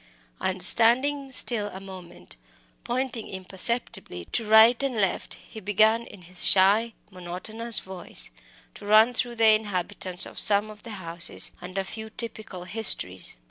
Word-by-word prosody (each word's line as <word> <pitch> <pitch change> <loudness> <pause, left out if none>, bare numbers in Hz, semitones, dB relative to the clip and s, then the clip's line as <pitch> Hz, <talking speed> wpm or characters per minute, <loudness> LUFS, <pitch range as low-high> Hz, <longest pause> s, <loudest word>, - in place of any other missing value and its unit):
And 185 -1 0
standing 265 +4 +4
still 230 -5 0
a 190 -2 -10
moment, 185 - -13 0.5
pointing 245 -2 -4
imperceptibly 190 - -4
to 225 - -2
right 220 +3 +5
and 275 -3 -3
left, 195 -4 -2
he 220 - -14
began 215 +3 +1
in 185 - -15
his 180 +1 +1
shy, 205 +4 +5 0.2
monotonous 190 +6 -3
voice 190 -2 -2 0.4
to 205 - -13
run 220 +3 +4
through 240 0 -2
the 225 -1 +3
inhabitants 195 -3 -2
of - - -8
some 210 +1 +2
of 210 -1 -15
the 235 - -12 0.2
houses 170 +1 -1
and 185 +2 -10
a 195 - -1
few 220 +3 -9
typical 220 -5 -7
histories. 180 - +1
210 Hz, 145 wpm, -24 LUFS, 185-230 Hz, 0.5 s, right